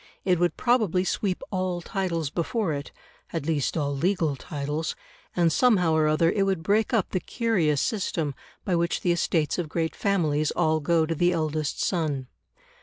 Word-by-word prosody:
It 180 -3 +3
would 175 0 +1
probably 215 -8 +2
sweep 190 0 -1
all 185 -2 -1
titles 170 -5 -2
before 180 +1 -1
it 140 0 -5 0.4
at 165 -4 -3
least 155 -1 0
all 145 -2 -1
legal 165 -1 +1
titles 145 +2 -4 0.4
and 170 -3 +3
somehow 185 -9 +4
or 155 -1 +3
other 160 +2 +3
it 200 - 0
would 190 -4 0
break 210 +4 +2
up 225 -6 +1
the 185 - 0
curious 180 - 0
system 165 -8 -1 0.3
by 185 - +1
which 170 0 0
the 175 - +2
estates 170 -2 +1
of 165 -3 -3
great 160 +1 -2
families 155 -7 +1
all 155 0 +1
go 160 +2 +2
to 165 - -1
the 175 +3 +2
eldest 155 -3 -1
son. 155 -7 -1
170 Hz, 175 wpm, -26 LUFS, 155-185 Hz, 0.4 s, somehow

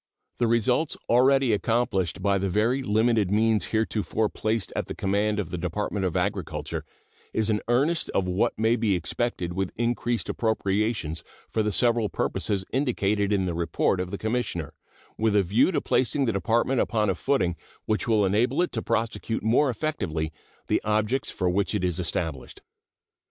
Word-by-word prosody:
The 120 - +3
results 120 +7 +1
already 130 0 +4
accomplished 105 -5 0
with 100 0 +2
the 100 - 0
very 115 +8 +1
limited 110 -3 +2
means 110 +1 +2
heretofore 110 -1 0
placed 110 -2 -2
at - - -2
the - - -5
command 105 +2 0
of 100 -6 -3
the 90 - -3
Department 95 +2 -2
of 85 - -2
Agriculture - - -2 0.5
is 110 0 +1
an 105 - 0
earnest 140 +8 +1
of 95 - 0
what 90 +2 0
may 110 +2 +3
be 110 -4 +1
expected 90 +1 -2
with 95 0 -2
increased 120 0 -1
appropriations 105 -6 -1 0.3
for 110 - +1
the 105 0 0
several 115 -1 +2
purposes 100 -3 -1
indicated 105 -6 +1
in 95 -2 +2
the 90 - -2
report 85 +2 0
of 90 0 -2
the 100 - -4
Commissioner, 110 - -2 0.5
with 110 -1 +2
a 100 - +5
view 105 - +3
to 165 - +1
placing 135 +2 +1
the 115 - 0
Department 120 +6 +1
upon 110 -2 +1
a - - 0
footing 90 -4 0 0.3
which 110 +2 -1
will 110 -3 +3
enable 120 - +2
it 180 - -2
to 115 - -3
prosecute 115 -1 -2
more 125 +6 +3
effectively 85 - -2 0.3
the - - +1
objects 110 +5 0
for 90 - -2
which 100 +4 0
it 100 - -1
is 90 -1 0
established. 80 -5 -3
110 Hz, 170 wpm, -26 LUFS, 95-120 Hz, 0.5 s, a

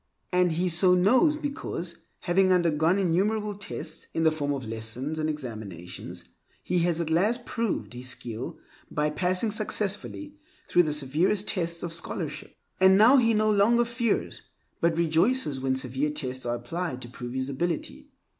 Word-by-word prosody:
And 180 -2 +3
he 175 +3 0
so 180 +1 +5
knows 255 - +4
because, 280 - -5 0.2
having 185 +1 +3
undergone 170 0 +3
innumerable 205 +4 +1
tests 170 -5 -5
in 165 - +1
the 160 - +5
forms 145 -2 -2
of - - -8
lessons 115 +7 -4
and 155 0 0
examinations, 110 - -7 0.4
he 180 0 0
has 170 -1 +1
at 165 -1 -2
last 220 +9 +1
proved 230 - -2
his 125 +1 -5
skill 120 -1 -6 0.3
by 150 0 0
passing 180 +7 +1
successfully 215 +8 -1 0.3
through 175 - +5
the 155 -3 -1
severest 155 +8 +1
tests 170 -3 +1
of 170 -1 -2
scholarship. 170 - -4 0.2
And 190 0 +6
now 235 +7 +7
he 230 -3 +3
no 215 0 +3
longer 230 +4 +4
fears, 235 -2 -1 0.4
but 165 -1 +1
rejoices 170 - +2
when 130 0 0
severe 130 +3 -1
tests 130 -4 -3
are 120 - 0
applied 130 +3 -4
to - - -8
prove 120 0 -8
his 130 +1 -2
ability. 165 +4 -3
170 Hz, 160 wpm, -27 LUFS, 145-200 Hz, 0.4 s, now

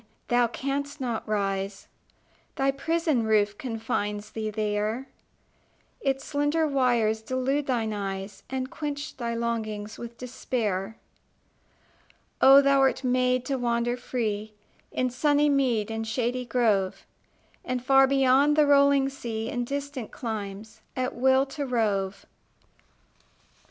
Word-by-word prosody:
Thou 240 0 +4
canst 280 +4 -3
not 240 -4 -3
rise: 195 -1 -2 0.7
Thy 270 0 +2
prison 315 -1 0
roof 210 -2 +2
confines 210 -3 -3
thee 220 -1 -3
there; 215 +4 -2 0.9
Its 270 -1 -1
slender 290 +2 +1
wires 240 -6 +2
delude 260 +4 -1
thine 230 -4 0
eyes, 195 -1 -5
And 260 0 -3
quench 295 -1 -5
thy 235 -2 -2
longings 220 -2 -3
with 235 0 -8
despair. 225 -5 -3 1.4
Oh, 275 +1 +8
thou 275 0 +4
wert 270 0 +2
made 255 0 +2
to 270 0 -1
wander 240 0 0
free 215 -4 -3 0.4
In 255 -1 0
sunny 290 +3 +3
mead 245 -6 +1
and 225 0 -3
shady 245 +2 -1
grove, 215 -7 +1 0.6
And 250 -1 -3
far 270 0 +6
beyond 270 +2 +4
the 300 -1 +5
rolling 280 -1 +5
sea, 230 -4 -4
In 245 0 -2
distant 280 -2 -4
climes, 220 -1 -6
at 255 0 -1
will 265 +2 +3
to 280 +1 -5
rove! 200 -5 -1
245 Hz, 120 wpm, -27 LUFS, 220-270 Hz, 1.4 s, Oh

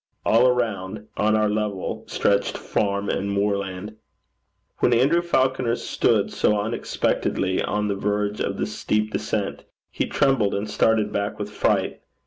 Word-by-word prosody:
All 115 +3 +5
around, 105 -5 -1
on 110 +1 +2
our 110 0 +2
level, 105 -2 -2
stretched 100 0 +1
farm 100 0 -1
and 100 +1 -1
moorland. 100 0 -2 0.8
When 120 - +3
Andrew 140 +9 +3
Falconer 130 -7 +1
stood - - +1
so 105 -1 +2
unexpectedly 100 -3 -1
on 105 0 -1
the 100 - 0
verge 105 +1 -1
of - - -2
the - - 0
steep 105 0 -1
descent, - - -2 0.3
he - - -1
trembled 135 -8 +2
and 100 +2 -2
started 105 0 +2
back 100 +1 -2
with 105 0 -5
fright. - - 0
105 Hz, 140 wpm, -23 LUFS, 100-115 Hz, 0.8 s, All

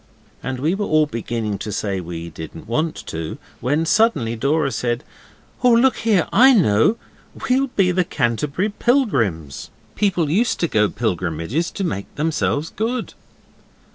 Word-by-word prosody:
And 130 -1 -4
we 155 +6 +1
were 205 +1 -2
all 155 0 +4
beginning 115 -5 -3
to 105 +1 -5
say 100 -1 -2
we 85 -1 -7
didn't 80 +4 -9
want 155 +8 -1
to, 80 -1 -5 0.2
when 150 +6 0
suddenly 160 - +2
Dora 140 +4 +1
said, 120 0 -2 0.6
'Oh, 250 - +6
look 250 +3 +4
here! 215 -6 +2
I 260 +2 +7
know. 155 - +3 0.5
We'll 265 +2 +2
be 195 -7 +2
the 180 0 +2
Canterbury 145 - -1
Pilgrims. 125 - 0 0.2
People 180 -7 +1
used 230 +8 +1
to 170 - +2
go 105 -7 +2
pilgrimages 95 - -2
to 195 - -5
make 100 - -4
themselves 155 0 -1
good. 230 +3 -3
150 Hz, 145 wpm, -21 LUFS, -, 0.6 s, I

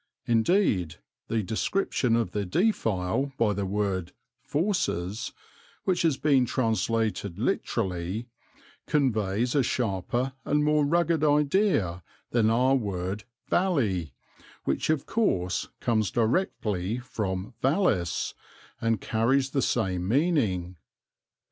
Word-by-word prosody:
Indeed, 115 - +2 0.3
the 110 -1 0
description 115 - 0
of 115 -6 0
the 105 +1 -1
defile 115 - 0
by 110 -3 +2
the 100 0 -2
word 95 -3 -1 0.3
fauces 115 - -1 0.5
(which 180 -2 +1
has 160 -5 +2
been 135 -5 +3
translated 110 -5 0
literally) 95 +5 -1 0.6
conveys 115 -5 +1
a 145 - +4
sharper 120 +2 -1
and 150 0 +1
more 150 0 +3
rugged 170 -1 +2
idea 145 - +2 0.3
than 115 -2 +3
our 125 +4 +3
word 100 -4 -2 0.2
"valley," 105 - +1 0.5
which, - - -1
of 155 -3 +1
course, 90 - 0
comes 110 -4 +1
directly 110 - 0
from 105 -4 -4
vallis 130 - +1 0.5
and 115 -1 +1
carries 130 +4 +1
the 135 - +1
same 95 -8 0
meaning. 110 - +1
115 Hz, 105 wpm, -27 LUFS, 95-140 Hz, 0.6 s, a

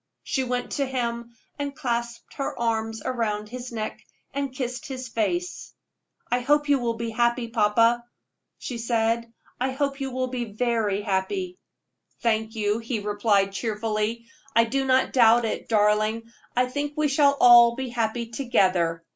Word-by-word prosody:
She 265 - -1
went 250 -1 -3
to 280 - 0
him 235 -2 -3 0.2
and 285 -1 -3
clasped 235 -4 -3
her 275 - -4
arms 225 -2 -1
around 215 -4 -2
his 250 +1 -7
neck, 220 -2 -4 0.3
and 280 -1 -2
kissed 255 +3 -4
his 260 -2 -6
face. 345 - -2 0.6
"I 245 - +3
hope 295 +4 +2
you 285 -1 +3
will 235 -2 -1
be 230 0 -4
happy, 235 +1 +1
papa," 230 +2 +3 0.5
she 240 -2 -6
said 230 0 0 0.3
"I 255 +2 0
hope 275 0 -2
you 270 - -2
will 255 0 -1
be 245 -1 -3
very 215 -3 0
happy." 355 - -2 0.6
"Thank 220 -1 0
you," 210 0 0
he 230 0 -3
replied, 205 -1 +1
cheerfully; 220 +1 -2 0.3
"I 230 - +6
do 270 +4 -1
not 260 0 +2
doubt 235 -1 +5
it, 220 - -4
darling. 215 +1 +2 0.3
I 250 +1 +3
think 285 +3 -3
we 305 0 +2
shall 280 0 +3
all 235 -1 +8
be 260 0 -4
happy 235 0 -1
together. 185 -10 +1
235 Hz, 155 wpm, -25 LUFS, 220-255 Hz, 0.6 s, all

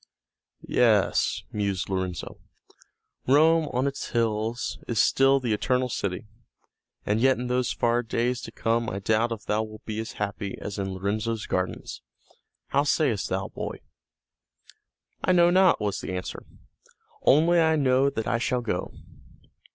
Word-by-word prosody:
"Yes," 110 -5 +2
mused 100 -3 -2
Lorenzo, 95 -2 -4 0.9
"Rome 155 +4 +4
on 125 +2 0
its 140 0 -3
hills 115 0 -1
is 115 - -1
still 135 0 +4
the 120 -4 -1
Eternal 125 +4 0
City. 100 -4 -3 0.8
And 105 +2 +1
yet 130 +1 +4
in 125 - -4
those 125 0 0
far 120 0 +1
days 120 +1 -1
to 115 - -8
come 115 0 0
I 95 - -4
doubt 110 +4 +1
if 110 -2 -5
thou 105 +1 +1
wilt 110 -1 -9
be 110 0 -4
as 110 0 -5
happy 100 -1 -4
as 100 0 -6
in 95 -1 -3
Lorenzo's 110 +3 -2
gardens. 90 0 -3 0.7
How 140 - +3
sayest 145 -7 +1
thou, 95 +1 -2
boy?" - - -6 1.4
"I 185 - +3
know 175 -1 +5
not," 185 0 +5
was 105 -2 -2
the - - -5
answer. 90 - -6 0.7
"Only 165 +5 +4
I 160 -1 +4
know 135 -1 +3
that 110 -5 -4
I 115 - 0
shall 125 +1 0
go." 115 - -3
115 Hz, 150 wpm, -26 LUFS, 105-130 Hz, 1.4 s, know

